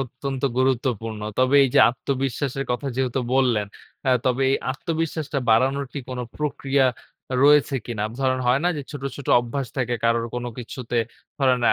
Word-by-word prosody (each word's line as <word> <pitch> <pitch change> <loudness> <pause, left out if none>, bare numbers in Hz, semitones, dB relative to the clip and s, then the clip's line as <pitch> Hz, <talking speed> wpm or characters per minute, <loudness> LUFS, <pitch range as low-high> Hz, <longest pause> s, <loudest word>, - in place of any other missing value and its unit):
অত্যন্ত 135 +1 -5 0.2
গুরুত্বপূর্ণ। 120 -4 0 0.2
তবে 130 +2 +4
এইযে 125 - +4
আত্মবিশ্বাসের 135 +1 -2
কথা 125 +3 -2
যেহেতু 130 0 0
বললেন 120 -6 +2 0.4
অ্যা 130 - +3
তবে 130 +1 +2
এই 135 - +3 0.2
আত্মবিশ্বাসটা 160 0 -2
বাড়ানোর 135 +5 +3
কি 145 - -4
কোনো 125 -1 -3
প্রক্রিয়া 140 -2 +1 0.6
রয়েছে 145 -1 +5
কিনা। 110 -3 -3 0.2
ধরেন 130 -1 +1
হয় 125 +3 +3
না - - +4
যে 145 - -4
ছোট, 145 -3 -7
ছোট 140 - -9
অভ্যাস 125 +3 -4
থাকে 125 -2 0
কারোর 115 0 +2
কোনো 120 0 -3
কিছুতে 120 0 -4 0.4
ধরেন 130 -3 +3
130 Hz, 155 wpm, -23 LUFS, 125-140 Hz, 0.6 s, রয়েছে